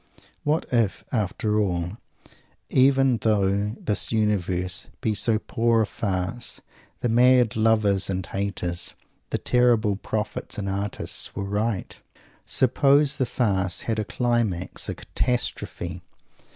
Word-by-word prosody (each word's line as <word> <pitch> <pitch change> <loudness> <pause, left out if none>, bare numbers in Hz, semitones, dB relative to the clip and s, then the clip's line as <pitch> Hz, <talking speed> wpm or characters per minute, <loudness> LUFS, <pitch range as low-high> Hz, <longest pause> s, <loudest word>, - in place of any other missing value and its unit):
What 150 +2 +1
if, 115 -5 +1
after 105 -1 0
all 90 -1 -1 0.7
even 135 -1 +4
though 105 -1 +1
this 105 - 0
universe 95 -4 0
be 110 - 0
so 110 +1 +2
poor 115 +1 +1
a - - 0
farce 100 +3 -3 0.4
the - - +1
mad 125 0 +4
lovers 110 -3 +3
and 95 -1 -2
haters, 90 -3 -3 0.3
the - - 0
terrible 120 -5 +2
prophets 105 +1 -4
and 100 -1 -3
artists, 100 +1 -3
were 100 - -3
right? 105 0 -2 0.5
Suppose 140 +2 +3
the 130 - 0
farce 95 -7 0
had 110 -1 -2
a - - 0
climax, 115 -6 -1
a - - -3
catastrophe! 90 -7 -3
105 Hz, 120 wpm, -25 LUFS, 95-120 Hz, 0.7 s, even